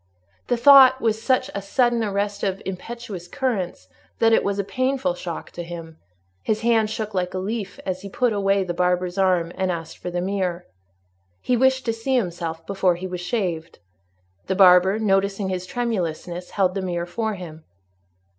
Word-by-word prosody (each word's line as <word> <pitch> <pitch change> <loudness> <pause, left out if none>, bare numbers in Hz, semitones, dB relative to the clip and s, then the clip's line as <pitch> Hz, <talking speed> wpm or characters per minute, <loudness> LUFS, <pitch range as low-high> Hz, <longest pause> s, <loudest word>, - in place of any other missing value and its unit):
The 245 - +1
thought 260 0 +8
was 220 -3 0
such 255 +2 +1
a 200 - -3
sudden 240 +3 +1
arrest 205 0 -2
of 195 -1 -1
impetuous 195 -1 -7
currents, 220 -7 -3 0.3
that 225 0 +4
it - - +4
was 200 0 -1
a 200 - 0
painful 255 -1 -1
shock 175 -1 -7
to 175 - -7
him; 165 -2 -9 0.4
his 215 - -1
hand 225 -2 +2
shook 215 -1 -4
like 180 -1 -2
a - - -1
leaf, 200 +1 -4
as 185 -1 -3
he 200 - -8
put 245 +3 +1
away 195 -1 +2
the 180 -2 -3
barber's 180 +1 0
arm 180 -3 +2
and 190 -1 -1
asked 165 -2 -6
for 180 - -5
the 175 0 -2
mirror. 185 -2 -2 0.7
He 250 - 0
wished 260 +1 +2
to 230 - 0
see 225 +4 -1
himself 170 -7 -2
before 190 -3 +1
he 180 +2 -7
was 180 -1 -5
shaved. 180 -4 -3 0.7
The 190 - 0
barber, 185 +1 +6
noticing 195 -2 +1
his 185 -1 -3
tremulousness, 180 -7 -3
held 185 -2 +1
the 195 - -2
mirror 175 -2 -2
for 220 +4 -3
him. 160 -4 -10
195 Hz, 180 wpm, -23 LUFS, 180-225 Hz, 0.7 s, thought